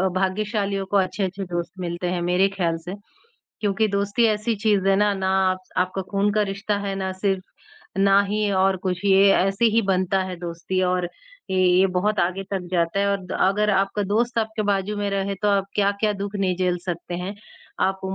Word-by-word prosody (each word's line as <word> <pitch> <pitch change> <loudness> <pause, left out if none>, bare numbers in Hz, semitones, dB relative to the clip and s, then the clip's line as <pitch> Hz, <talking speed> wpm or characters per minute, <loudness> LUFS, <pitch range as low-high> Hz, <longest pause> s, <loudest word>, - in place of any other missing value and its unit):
भाग्यशालियों 200 +1 -1
को 200 +2 +1
अच्छे-अच्छे 190 0 -1
दोस्त 175 -1 -4
मिलते 175 0 -3
हैं 180 -1 -1
मेरे 180 +2 +3
ख्याल 175 -4 -1
से। 180 - -5 0.7
क्योंकि 210 +1 +1
दोस्ती 200 +4 +1
ऐसी 215 +1 0
चीज़ 205 -2 +1
है 195 - +5
ना, 210 0 +3
ना 190 -1 -1 0.5
आपका 185 +1 -1
खून 200 +1 +1
का 210 0 +2
रिश्ता 200 +1 -2
है 200 -1 -3
ना 190 -1 -2
सिर्फ़ 190 0 -1 0.6
ना 195 0 +5
ही 210 +1 0
और 190 0 +3
कुछ। 185 +1 -2
ये 195 0 +6
ऐसे 195 +4 +1
ही 230 - +5
बनता 185 0 +2
है 185 -1 -5
दोस्ती 175 +2 -3
और 180 -1 0 0.4
ये, 190 - +1
ये 185 +1 +5
बहुत 210 +3 +1
आगे 185 +3 0
तक 190 -3 -3
जाता 170 +2 +1
है। 200 - +2
और 185 -2 -12 0.2
अगर 210 +2 +1
आपका 195 +1 +1
दोस्त 230 +4 0
आपके 220 0 -1
बाजू 200 +1 -1
में 205 0 -1
रहे 195 0 -1
तो 210 - +3
आप 200 -1 +2
क्या-क्या 205 +1 +1
दुख 200 +1 -5
नहीं 190 -2 0
झेल 180 -1 0
सकते 175 0 -4
हैं। 180 +3 -4 0.5
आप 190 0 -2
195 Hz, 190 wpm, -23 LUFS, 185-205 Hz, 0.7 s, ये